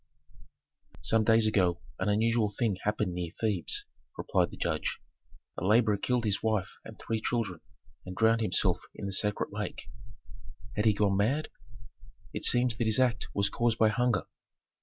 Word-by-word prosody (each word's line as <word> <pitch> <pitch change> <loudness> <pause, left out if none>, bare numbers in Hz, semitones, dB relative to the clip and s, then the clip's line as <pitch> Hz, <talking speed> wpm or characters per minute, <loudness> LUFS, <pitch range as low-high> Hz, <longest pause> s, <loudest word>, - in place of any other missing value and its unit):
"Some 110 -1 +2
days 115 0 +4
ago 95 -5 +2 0.2
an 95 - 0
unusual 110 +1 +2
thing 105 -1 -1
happened 105 -4 0
near 85 -2 -4
Thebes," 105 -6 -1 0.3
replied - - +1
the - - -11
judge. - - -2 0.6
"A - - -6
laborer 105 +2 +4
killed 125 +3 0
his 100 -2 0
wife 110 -4 0
and - - -11
three 110 -1 -3
children 105 -10 -2 0.4
and 90 0 -8
drowned 115 +2 +3
himself 105 -5 +1 0.2
in - - -6
the 100 - -2
sacred 105 +2 0
lake." 105 +1 -5 0.8
"Had 105 - 0
he 110 - +5
gone 100 -1 +1
mad?" 130 +10 +1 0.8
"It - - -4
seems 120 -1 +4
that 120 - 0
his 110 +2 +2
act 120 -4 +1
was 100 0 +1
caused 120 -1 +1
by 110 - +4
hunger." 120 -1 +1
110 Hz, 160 wpm, -29 LUFS, 100-115 Hz, 0.8 s, he